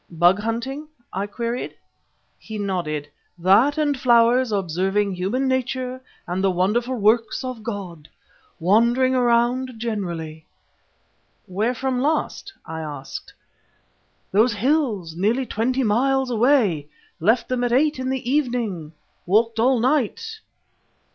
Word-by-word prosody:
"Bug 175 Hz, +3 st, +3 dB
hunting?" 240 Hz, +7 st, -3 dB, 0.3 s
I 195 Hz, +2 st, -2 dB
queried. 235 Hz, +4 st, -4 dB, 0.6 s
He 220 Hz, -, -7 dB
nodded. 175 Hz, -7 st, -2 dB, 0.3 s
"That 200 Hz, -, +4 dB
and 295 Hz, -2 st, +1 dB
flowers 240 Hz, -1 st, +4 dB
and 205 Hz, -, +2 dB
observing 195 Hz, +3 st, 0 dB
human 200 Hz, +9 st, -1 dB
nature 255 Hz, 0 st, -2 dB, 0.2 s
and 180 Hz, +2 st, -2 dB
the 195 Hz, -, +4 dB
wonderful 210 Hz, +8 st, 0 dB
works 225 Hz, +4 st, +2 dB
of 255 Hz, -3 st, -5 dB
God. 190 Hz, -8 st, -6 dB, 0.5 s
Wandering 235 Hz, +8 st, +3 dB
around 245 Hz, +1 st, +2 dB
generally." 170 Hz, -9 st, -4 dB, 1.0 s
"Where 210 Hz, +6 st, -1 dB
from 255 Hz, 0 st, -1 dB
last?" 315 Hz, +7 st, -1 dB
I 160 Hz, 0 st, -6 dB
asked. 145 Hz, -4 st, -7 dB, 1.0 s
"Those 220 Hz, +4 st, +4 dB
hills 215 Hz, -, 0 dB
nearly 220 Hz, +9 st, +1 dB
twenty 250 Hz, +4 st, 0 dB
miles 260 Hz, +4 st, +1 dB
away. 225 Hz, -, +2 dB, 0.3 s
Left 225 Hz, +7 st, +2 dB
them 250 Hz, -1 st, -1 dB
at 245 Hz, -, 0 dB
eight 290 Hz, +3 st, +2 dB
in 260 Hz, 0 st, -2 dB
the 265 Hz, -2 st, -3 dB
evening; 240 Hz, -, -1 dB, 0.3 s
walked 225 Hz, +4 st, +2 dB
all 250 Hz, +2 st, +3 dB
night." 300 Hz, -, 0 dB
230 Hz, 120 wpm, -22 LUFS, 190-255 Hz, 1.0 s, That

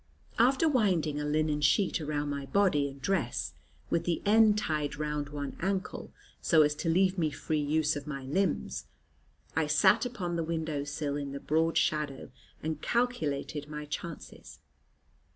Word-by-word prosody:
After 265 Hz, +7 st, +4 dB
winding 185 Hz, -, +2 dB
a -, -, -2 dB
linen 150 Hz, 0 st, +1 dB
sheet 170 Hz, +4 st, +2 dB
around 150 Hz, -1 st, -2 dB
my 140 Hz, -1 st, -4 dB
body 165 Hz, -8 st, +2 dB
and 135 Hz, 0 st, -12 dB
dress, 120 Hz, -, -1 dB, 0.4 s
with 165 Hz, -, +2 dB
the 170 Hz, -2 st, 0 dB
end 215 Hz, 0 st, +5 dB
tied 155 Hz, -7 st, -1 dB
round 150 Hz, -1 st, -3 dB
one 145 Hz, -1 st, -5 dB
ankle, 190 Hz, +2 st, -2 dB, 0.3 s
so 160 Hz, -3 st, +5 dB
as 150 Hz, 0 st, +2 dB
to 165 Hz, -, -1 dB
leave 185 Hz, +2 st, +3 dB
me 160 Hz, -2 st, +2 dB
free 150 Hz, +1 st, -2 dB
use 150 Hz, +1 st, +1 dB
of 145 Hz, 0 st, -6 dB
my 140 Hz, -2 st, -5 dB
limbs, 135 Hz, -, -1 dB, 0.7 s
I 160 Hz, -1 st, +2 dB
sat 190 Hz, +8 st, +4 dB
upon 185 Hz, -9 st, -3 dB
the 165 Hz, -, 0 dB
window 160 Hz, -3 st, -2 dB
sill 145 Hz, 0 st, -3 dB
in 140 Hz, -1 st, -4 dB
the 140 Hz, -, -4 dB
broad 160 Hz, +3 st, +1 dB
shadow, 150 Hz, -4 st, 0 dB, 0.3 s
and 155 Hz, -1 st, -3 dB
calculated 155 Hz, -, -1 dB
my 150 Hz, 0 st, -5 dB
chances. 165 Hz, +2 st, -7 dB
155 Hz, 160 wpm, -30 LUFS, 145-185 Hz, 0.7 s, end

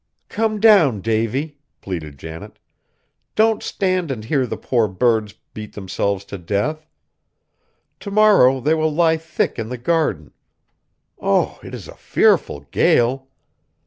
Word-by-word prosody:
"Come 220 Hz, -1 st, -1 dB
down, 180 Hz, -, +5 dB
Davy," 115 Hz, -, -2 dB, 0.2 s
pleaded 80 Hz, -7 st, -6 dB
Janet, 80 Hz, +2 st, -10 dB, 0.8 s
"don't 220 Hz, 0 st, +3 dB
stand 185 Hz, -4 st, -1 dB
and 115 Hz, -5 st, -5 dB
hear 130 Hz, 0 st, 0 dB
the -, -, -5 dB
poor 120 Hz, -4 st, 0 dB
birds 110 Hz, +1 st, 0 dB, 0.2 s
beat 105 Hz, -1 st, -8 dB
themselves 100 Hz, 0 st, -3 dB
to 100 Hz, -, -8 dB
death. 135 Hz, -, -2 dB, 1.1 s
To 200 Hz, -, -7 dB
morrow 200 Hz, -11 st, +5 dB
they 150 Hz, +5 st, +1 dB
will 155 Hz, 0 st, +1 dB
lie 160 Hz, +1 st, +2 dB
thick 160 Hz, -5 st, -3 dB
in 110 Hz, 0 st, -4 dB
the 125 Hz, -, -5 dB
garden. 120 Hz, -, -1 dB, 0.9 s
Oh! -, -, 0 dB
it -, -, -8 dB
is -, -, -10 dB
a -, -, -10 dB
fearful 70 Hz, -, +1 dB
gale! 130 Hz, +3 st, +2 dB
130 Hz, 135 wpm, -20 LUFS, 105-160 Hz, 1.1 s, down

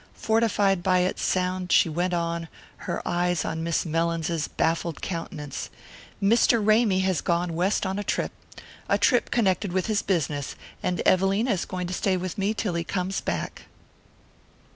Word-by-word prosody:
Fortified 210 Hz, -4 st, +2 dB
by 185 Hz, 0 st, +3 dB
its 180 Hz, -, -1 dB
sound 185 Hz, -1 st, 0 dB
she -, -, +5 dB
went 175 Hz, +3 st, -1 dB
on, 170 Hz, -1 st, -1 dB, 0.4 s
her -, -, -3 dB
eyes 175 Hz, 0 st, 0 dB
on 160 Hz, 0 st, -3 dB
Miss 170 Hz, +1 st, 0 dB
Mellins's 165 Hz, 0 st, -1 dB
baffled 165 Hz, -1 st, -1 dB
countenance: 165 Hz, -5 st, -5 dB, 0.5 s
"Mr. 230 Hz, +3 st, +4 dB
Ramy 215 Hz, -2 st, +3 dB
has 190 Hz, -4 st, +1 dB
gone 170 Hz, 0 st, 0 dB
west 185 Hz, +5 st, +1 dB
on 190 Hz, +1 st, -2 dB
a -, -, -2 dB
trip -, -, -1 dB, 0.6 s
a -, -, +4 dB
trip 245 Hz, -3 st, +3 dB
connected 200 Hz, -3 st, +1 dB
with 185 Hz, 0 st, 0 dB
his 215 Hz, -2 st, +1 dB
business; 150 Hz, -6 st, -1 dB, 0.3 s
and 180 Hz, -1 st, -1 dB
Evelina 195 Hz, +6 st, +3 dB
is 190 Hz, -4 st, 0 dB
going 180 Hz, -1 st, -4 dB
to 180 Hz, -, -4 dB
stay 185 Hz, +1 st, +1 dB
with 180 Hz, -1 st, -4 dB
me 200 Hz, +3 st, 0 dB
till 205 Hz, -4 st, -1 dB
he 170 Hz, 0 st, -1 dB
comes 185 Hz, +2 st, -2 dB
back." -, -, -4 dB
180 Hz, 165 wpm, -26 LUFS, 170-195 Hz, 0.6 s, she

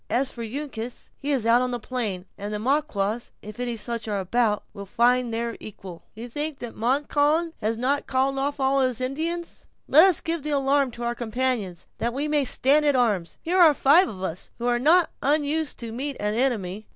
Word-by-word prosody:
As 265 Hz, +2 st, +1 dB
for 235 Hz, -, -9 dB
Uncas, 245 Hz, -1 st, -6 dB
he 285 Hz, -, -5 dB
is 265 Hz, -6 st, +1 dB
out 235 Hz, +2 st, +5 dB
on 255 Hz, -, 0 dB
the 245 Hz, -1 st, -3 dB
plain, 215 Hz, -7 st, -3 dB
and 205 Hz, +1 st, -6 dB
the 210 Hz, -, -2 dB
Maquas, 235 Hz, -3 st, -1 dB
if 210 Hz, +2 st, -10 dB
any 240 Hz, -2 st, -2 dB
such 230 Hz, 0 st, -4 dB
are 205 Hz, -2 st, -1 dB
about 210 Hz, +3 st, +1 dB
us, -, -, -19 dB
will 200 Hz, -, -8 dB
find 245 Hz, +3 st, +2 dB
their 230 Hz, 0 st, -3 dB
equal." 190 Hz, -5 st, -10 dB
"You 230 Hz, +3 st, -7 dB
think 295 Hz, +4 st, -3 dB
that 240 Hz, -3 st, -7 dB
Montcalm 290 Hz, +6 st, +1 dB
has 220 Hz, +2 st, -1 dB
not 275 Hz, +4 st, 0 dB
called 270 Hz, +1 st, +1 dB
off 285 Hz, +1 st, -2 dB
all 270 Hz, +1 st, +2 dB
his 255 Hz, -3 st, 0 dB
Indians? 325 Hz, +7 st, -4 dB, 0.2 s
Let 310 Hz, +4 st, +7 dB
us 375 Hz, -4 st, +3 dB
give 330 Hz, -1 st, -2 dB
the 300 Hz, -, -4 dB
alarm 280 Hz, -1 st, +2 dB
to 240 Hz, -, -7 dB
our 235 Hz, 0 st, -1 dB
companions, 235 Hz, -6 st, -2 dB
that 235 Hz, +1 st, -2 dB
we 285 Hz, +2 st, -1 dB
may 295 Hz, -2 st, +1 dB
stand 280 Hz, +4 st, +3 dB
to 290 Hz, -3 st, +3 dB
our 245 Hz, -3 st, +4 dB
arms. 170 Hz, -4 st, -8 dB
Here 360 Hz, +3 st, +1 dB
are 320 Hz, -4 st, +7 dB
five 320 Hz, +9 st, +5 dB
of 190 Hz, -2 st, -8 dB
us, 175 Hz, -1 st, -5 dB
who 240 Hz, -, -5 dB
are 240 Hz, 0 st, +2 dB
not 325 Hz, +6 st, +4 dB
unused 300 Hz, +1 st, +1 dB
to 230 Hz, -1 st, -6 dB
meet 270 Hz, +4 st, -4 dB
an 210 Hz, 0 st, -1 dB
enemy." 215 Hz, -5 st, -1 dB
250 Hz, 215 wpm, -24 LUFS, 225-285 Hz, 0.2 s, Let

